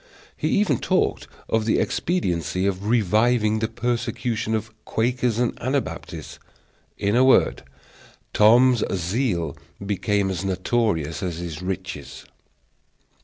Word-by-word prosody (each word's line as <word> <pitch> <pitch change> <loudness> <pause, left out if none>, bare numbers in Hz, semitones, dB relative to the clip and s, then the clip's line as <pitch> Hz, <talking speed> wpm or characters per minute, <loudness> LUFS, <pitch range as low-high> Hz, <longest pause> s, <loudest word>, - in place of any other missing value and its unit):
He - - -2
even 195 - +2
talked - - 0 0.2
of 110 -1 0
the 110 - +2
expediency 90 - -1
of 100 +1 -2
reviving 110 0 +2
the 110 - 0
persecution 120 -2 -2
of 110 0 -4
Quakers 120 0 0
and 120 0 0
Anabaptists. 130 +2 -4 0.6
In 100 +2 0
a 125 - +5
word, 130 - +4 0.7
Tom's 120 +2 +5
zeal 90 -1 -1 0.3
became 100 0 0
as 90 0 -3
notorious 95 -4 0
as 90 -3 -3
his 85 -2 -6
riches. 95 -5 -6
110 Hz, 115 wpm, -23 LUFS, 95-120 Hz, 0.7 s, a